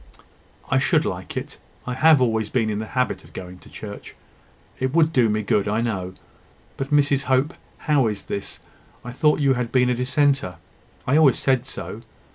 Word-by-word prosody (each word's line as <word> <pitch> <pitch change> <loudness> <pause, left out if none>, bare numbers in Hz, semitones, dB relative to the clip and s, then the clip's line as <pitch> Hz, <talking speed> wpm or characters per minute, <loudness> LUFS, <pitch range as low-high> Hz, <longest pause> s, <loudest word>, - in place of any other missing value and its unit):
"I - - +4
should - - +2
like - - -5
it... - - -6 0.3
I 125 - -3
have 155 +3 +5
always 110 -4 +1
been 110 -3 0
in 105 - -2
the 110 - -5
habit 125 - 0
of - - -18
going 90 0 -9
to - - -17
church... 100 -1 -9 0.6
It 130 +3 -1
would 160 -1 +4
do 120 -5 +4
me 105 0 0
good, 105 0 +1
I 105 +2 0
know. 95 -6 -3 0.6
But, 135 0 -4
Mrs 145 -1 +2
Hope, 130 +5 +1 0.3
how 145 -5 +3
is 105 -2 -4
this? 100 - -6 0.4
I 120 - -5
thought 150 +4 +2
you 135 -1 +4
had 125 -2 -3
been 125 -1 +3
a - - +2
dissenter. 130 -4 +1 0.5
I 140 +4 +3
always 145 -6 +5
said 130 -1 +1
so. 115 -3 -7
125 Hz, 190 wpm, -23 LUFS, 110-140 Hz, 0.6 s, have